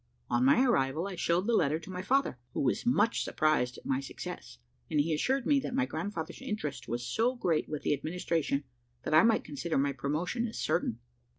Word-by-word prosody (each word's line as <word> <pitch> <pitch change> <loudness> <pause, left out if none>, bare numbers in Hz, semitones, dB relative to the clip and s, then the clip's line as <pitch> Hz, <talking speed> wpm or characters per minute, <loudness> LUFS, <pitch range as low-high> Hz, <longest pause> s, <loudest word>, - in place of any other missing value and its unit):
On 120 +1 +3
my 190 - +5
arrival 160 - +1
I 200 - -5
showed 175 +2 +1
the 235 - +1
letter 155 -7 +3
to 170 +3 -10
my 180 0 -4
father, 255 - +1 0.2
who - - 0
was 140 - 0
much 235 -2 +3
surprised 135 -6 +1
at - - -14
my 130 -1 +1
success, 135 - -7 0.3
and 150 - +1
he 160 +3 +2
assured 260 - 0
me 285 -2 +4
that 255 - -4
my 270 0 +2
grandfather's 200 -5 -5
interest 150 - -4
was 120 +2 -3
so 240 - +1
great 170 -10 0
with 150 -2 -4
the - - +2
Administration, 155 -1 -1 0.4
that - - -2
I 155 - +8
might 230 +2 +3
consider 155 +3 -3
my 140 +1 +1
promotion 170 - -1
as 225 - -7
certain. - - 0
165 Hz, 205 wpm, -31 LUFS, 140-225 Hz, 0.4 s, I